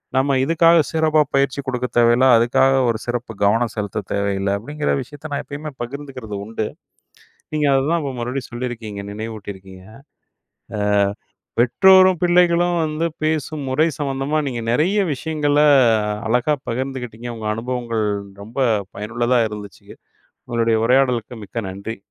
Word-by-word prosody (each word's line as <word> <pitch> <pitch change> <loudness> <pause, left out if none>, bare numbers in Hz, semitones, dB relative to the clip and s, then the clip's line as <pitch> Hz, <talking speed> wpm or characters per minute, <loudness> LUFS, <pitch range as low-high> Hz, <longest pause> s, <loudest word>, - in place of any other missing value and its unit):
நம்ம 135 +1 +2
இதுக்காக 165 +3 +4
சிறப்பா 155 -1 +2
பயிற்சி 140 0 +1
கொடுக்கத் 125 -1 -3
தேவையில்ல. 120 +2 +5
அதுக்காக 130 +3 +3
ஒரு 115 - 0
சிறப்பு 120 -1 -3
கவனம் 115 +3 +2
செலுத்த 105 -1 -3
தேவையில்ல. 100 -1 -1
அப்டிங்கிற 145 +8 -3
விஷயத்த 145 +4 -10
நான் 140 - -1
எப்பயுமே 150 +2 -7
பகிர்ந்துக்கறது 130 -4 -6
உண்டு. 110 0 -3 0.9
நீங்க 150 -1 +1
அததான் 145 +5 +2
இப்போ 140 -2 -3
மறுபடியும் 125 +2 -4
சொல்லியிருக்கீங்க 120 -4 -5
நினைவூட்டியிருக்கீங்க. 100 -3 -8
ஆ - - -13 1.6
பெற்றோரும், 185 +7 +5
பிள்ளைகளும் 175 0 +3
வந்து 155 +2 -1 0.2
பேசும் 155 -1 -2
முறை 150 +5 +2
சம்மந்தமா 140 +1 -1
நீங்க 120 -3 -4
நிறைய 175 - +2
விஷயங்கள 145 +2 -1 0.7
அழகா 125 +6 +2
பகிர்ந்துக்கிட்டீங்க. 125 -2 -4
உங்க 110 -1 -5
அனுபவங்கள் 115 -1 -2 0.4
ரொம்ப 115 +5 -13 0.4
பயனுள்ளதா 120 +4 0
இருந்துச்சு. 105 -1 -10 0.6
உங்களுடைய 115 -1 +1
உரையாடலுக்கு 125 -3 +1
மிக்க 110 +1 -5
நன்றி. 100 +4 -6
125 Hz, 120 wpm, -20 LUFS, 115-145 Hz, 1.6 s, தேவையில்ல